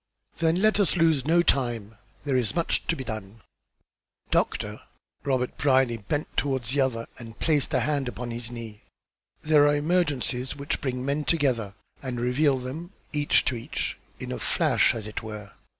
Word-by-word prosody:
"Then, 165 Hz, +4 st, +2 dB
let 215 Hz, -1 st, +4 dB
us 195 Hz, -2 st, +3 dB
lose 160 Hz, -5 st, +3 dB
no 170 Hz, +2 st, +5 dB
time; 120 Hz, -8 st, +1 dB, 0.3 s
there 140 Hz, -2 st, 0 dB
is 125 Hz, +1 st, +1 dB
much 170 Hz, -1 st, +1 dB
to 165 Hz, -, +2 dB
be 135 Hz, -, -5 dB
done." 110 Hz, -2 st, -7 dB, 0.9 s
"Doctor," -, -, 0 dB, 0.4 s
Robert 130 Hz, -3 st, 0 dB
Brierly 130 Hz, -4 st, +3 dB
bent 145 Hz, +8 st, -2 dB
toward 135 Hz, -3 st, 0 dB
the 135 Hz, +5 st, 0 dB
other 115 Hz, -3 st, 0 dB
and 115 Hz, -1 st, -9 dB
placed 150 Hz, -4 st, +2 dB
a -, -, +3 dB
hand 145 Hz, -3 st, 0 dB
upon 125 Hz, -1 st, -5 dB
his 115 Hz, 0 st, -4 dB
knee. 115 Hz, -3 st, -8 dB, 0.6 s
"There 150 Hz, -2 st, +5 dB
are 145 Hz, -, +4 dB
emergencies 145 Hz, -5 st, 0 dB
which 140 Hz, +1 st, -3 dB
bring 125 Hz, -2 st, -2 dB
men 140 Hz, +2 st, 0 dB
together 125 Hz, -, +1 dB, 0.3 s
and 125 Hz, -3 st, -4 dB
reveal 130 Hz, +3 st, +2 dB
them, 150 Hz, +9 st, -6 dB, 0.2 s
each 145 Hz, -1 st, +3 dB
to 130 Hz, -, 0 dB
each, 115 Hz, -, -3 dB, 0.2 s
in -, -, -5 dB
a -, -, -3 dB
flash, -, -, +3 dB
as 110 Hz, -2 st, -5 dB
it 105 Hz, -, -5 dB
were. 105 Hz, -2 st, -8 dB
130 Hz, 170 wpm, -26 LUFS, 120-150 Hz, 0.9 s, no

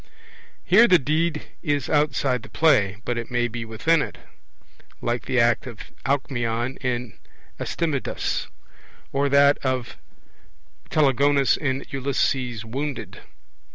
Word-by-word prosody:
Here 225 Hz, +6 st, +6 dB
the 185 Hz, -, +6 dB
deed 155 Hz, +2 st, 0 dB, 0.2 s
is 145 Hz, -6 st, -1 dB
outside 140 Hz, -4 st, +1 dB
the -, -, -13 dB
play; 115 Hz, -12 st, +3 dB
but 120 Hz, -1 st, -1 dB
it 115 Hz, -, -6 dB
may 120 Hz, -1 st, +1 dB
be 120 Hz, 0 st, -5 dB
within 145 Hz, +9 st, +1 dB
it, -, -, -5 dB, 0.8 s
like 120 Hz, 0 st, -2 dB
the 130 Hz, -2 st, +1 dB
act 115 Hz, 0 st, +2 dB
of 120 Hz, -4 st, -8 dB
the -, -, -10 dB, 0.2 s
Alcmeon 125 Hz, -2 st, -1 dB
in 125 Hz, -2 st, -3 dB, 0.4 s
Astydamas, 155 Hz, -6 st, -2 dB, 0.6 s
or 140 Hz, +1 st, +1 dB
that 140 Hz, +1 st, +5 dB
of 130 Hz, -3 st, -2 dB, 0.9 s
the -, -, -26 dB
Telegonus 140 Hz, -1 st, +3 dB
in 135 Hz, -2 st, -2 dB
Ulysses 130 Hz, -3 st, -1 dB
Wounded. 135 Hz, +4 st, -5 dB
135 Hz, 125 wpm, -24 LUFS, 120-145 Hz, 0.9 s, Here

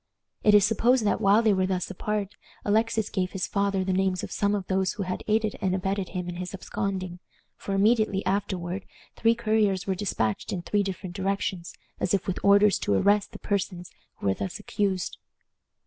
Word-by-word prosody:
It 210 Hz, -1 st, +5 dB
is 205 Hz, -2 st, +7 dB
supposed 230 Hz, +2 st, +3 dB
that 205 Hz, -, +1 dB
while 205 Hz, +3 st, +5 dB
they 215 Hz, -2 st, +4 dB
were 185 Hz, -1 st, +1 dB
thus 185 Hz, 0 st, -2 dB
apart 205 Hz, +1 st, -3 dB, 0.3 s
Alexis 220 Hz, 0 st, +1 dB
gave 185 Hz, -2 st, -2 dB
his 190 Hz, -1 st, -1 dB
father 200 Hz, -1 st, 0 dB
the 190 Hz, 0 st, 0 dB
names 185 Hz, -1 st, +1 dB
of -, -, -6 dB
some 205 Hz, 0 st, +1 dB
of 195 Hz, -2 st, -3 dB
those 190 Hz, 0 st, 0 dB
who 210 Hz, -, -3 dB
had 185 Hz, 0 st, -4 dB
aided 215 Hz, 0 st, +1 dB
and 185 Hz, -2 st, +1 dB
abetted 190 Hz, 0 st, -2 dB
him 180 Hz, -2 st, -4 dB
in 175 Hz, 0 st, -5 dB
his 180 Hz, +1 st, -5 dB
absconding, 185 Hz, -2 st, -4 dB, 0.4 s
for 195 Hz, -, -4 dB
immediately 210 Hz, -1 st, +2 dB
afterward 190 Hz, -1 st, -2 dB, 0.3 s
three 230 Hz, +1 st, +3 dB
couriers 215 Hz, -4 st, +1 dB
were 195 Hz, -, 0 dB
dispatched 175 Hz, -, -2 dB
in 175 Hz, -3 st, -3 dB
three 205 Hz, +3 st, +1 dB
different 190 Hz, -2 st, -5 dB
directions, 190 Hz, -2 st, -2 dB, 0.2 s
as 185 Hz, -, +1 dB
if 195 Hz, -, -2 dB
with 185 Hz, -, -2 dB
orders 200 Hz, 0 st, +5 dB
to 100 Hz, -, +1 dB
arrest 205 Hz, -, +3 dB
the -, -, -9 dB
persons 185 Hz, -3 st, -3 dB, 0.2 s
who -, -, -9 dB
were 95 Hz, -, +3 dB
thus 185 Hz, -, -4 dB
accused. 200 Hz, -4 st, -2 dB
195 Hz, 195 wpm, -26 LUFS, 185-205 Hz, 0.4 s, is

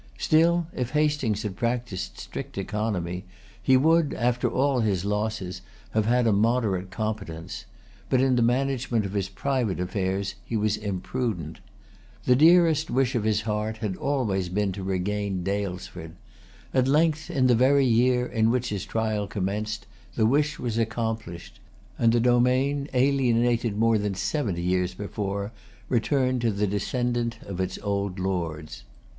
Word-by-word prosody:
Still 170 Hz, +2 st, +3 dB
if 125 Hz, +1 st, -3 dB
Hastings 150 Hz, -8 st, +1 dB
had 105 Hz, -3 st, -4 dB
practised 115 Hz, -2 st, -3 dB
strict -, -, -7 dB
economy, 95 Hz, -3 st, -2 dB, 0.4 s
he 130 Hz, -1 st, +5 dB
would, 160 Hz, +2 st, +3 dB
after 125 Hz, +1 st, +1 dB
all 135 Hz, 0 st, +1 dB
his 100 Hz, -5 st, 0 dB
losses, 105 Hz, -3 st, -2 dB, 0.3 s
have 110 Hz, -1 st, +1 dB
had 120 Hz, +1 st, +3 dB
a 110 Hz, -, +4 dB
moderate 105 Hz, -3 st, +1 dB
competence; 100 Hz, -5 st, -5 dB, 0.4 s
but 130 Hz, -, +3 dB
in 130 Hz, 0 st, +3 dB
the 120 Hz, -, +2 dB
management 125 Hz, -2 st, +1 dB
of 95 Hz, -, -5 dB
his 95 Hz, -2 st, -1 dB
private 115 Hz, -1 st, -1 dB
affairs 95 Hz, +2 st, -1 dB
he 115 Hz, -, -2 dB
was 105 Hz, 0 st, +1 dB
imprudent. 100 Hz, -, -3 dB, 0.7 s
The 125 Hz, -, +5 dB
dearest 160 Hz, +1 st, +5 dB
wish 130 Hz, 0 st, +1 dB
of 115 Hz, -4 st, -1 dB
his 110 Hz, -1 st, +2 dB
heart 105 Hz, +1 st, -2 dB
had 105 Hz, -4 st, -3 dB
always 105 Hz, -9 st, -1 dB
been 100 Hz, +2 st, 0 dB
to 95 Hz, +1 st, -6 dB
regain 95 Hz, 0 st, -2 dB
Daylesford. 90 Hz, -4 st, -4 dB, 0.6 s
At 130 Hz, -1 st, +3 dB
length, 155 Hz, +2 st, +2 dB
in 130 Hz, -2 st, +1 dB
the 125 Hz, -, +5 dB
very 135 Hz, +3 st, +4 dB
year 125 Hz, +1 st, +3 dB
in 110 Hz, -2 st, +1 dB
which 125 Hz, 0 st, 0 dB
his 100 Hz, -1 st, -4 dB
trial 110 Hz, -2 st, -1 dB
commenced, 105 Hz, +2 st, -3 dB, 0.3 s
the 110 Hz, -, +2 dB
wish 145 Hz, +5 st, +2 dB
was 115 Hz, -2 st, -2 dB
accomplished; 110 Hz, -6 st, -3 dB, 0.4 s
and 115 Hz, -1 st, +4 dB
the 120 Hz, -, +3 dB
domain, 125 Hz, +4 st, +2 dB
alienated 120 Hz, -4 st, +2 dB
more 115 Hz, 0 st, +3 dB
than 100 Hz, -1 st, -2 dB
seventy 95 Hz, -, -1 dB
years 90 Hz, 0 st, 0 dB
before, 100 Hz, 0 st, -4 dB, 0.4 s
returned 130 Hz, +1 st, +1 dB
to 120 Hz, -, +2 dB
the 100 Hz, +1 st, 0 dB
descendant 120 Hz, +3 st, -1 dB
of 95 Hz, -2 st, -4 dB
its 95 Hz, 0 st, -2 dB
old 100 Hz, -2 st, -1 dB
lords. 85 Hz, -5 st, -3 dB
110 Hz, 150 wpm, -26 LUFS, 100-125 Hz, 0.7 s, he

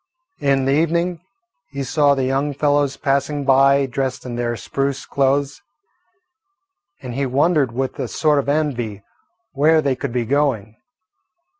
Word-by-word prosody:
In 140 Hz, -2 st, +1 dB
the 135 Hz, -, +1 dB
evening 170 Hz, +3 st, 0 dB, 0.5 s
he 140 Hz, 0 st, -5 dB
saw 140 Hz, +2 st, +2 dB
the 135 Hz, -, -1 dB
young 135 Hz, +2 st, -1 dB
fellows 145 Hz, -1 st, +1 dB
passing 140 Hz, +1 st, -1 dB
by 135 Hz, +1 st, +4 dB
dressed 130 Hz, 0 st, -3 dB
in 120 Hz, -2 st, -5 dB
their 120 Hz, 0 st, -2 dB
spruce 135 Hz, +7 st, -3 dB
clothes, 140 Hz, +1 st, 0 dB, 1.4 s
and 125 Hz, -2 st, -6 dB
he 135 Hz, +2 st, -1 dB
wondered 140 Hz, 0 st, +2 dB
with 130 Hz, +2 st, -3 dB
a -, -, -2 dB
sort 150 Hz, -2 st, +1 dB
of 140 Hz, -, -2 dB
envy 125 Hz, -9 st, -2 dB, 0.5 s
where 155 Hz, +3 st, +4 dB
they 140 Hz, -3 st, 0 dB
could 135 Hz, 0 st, -5 dB
be 120 Hz, -1 st, -1 dB
going. 120 Hz, -5 st, 0 dB
140 Hz, 145 wpm, -20 LUFS, 130-145 Hz, 1.4 s, by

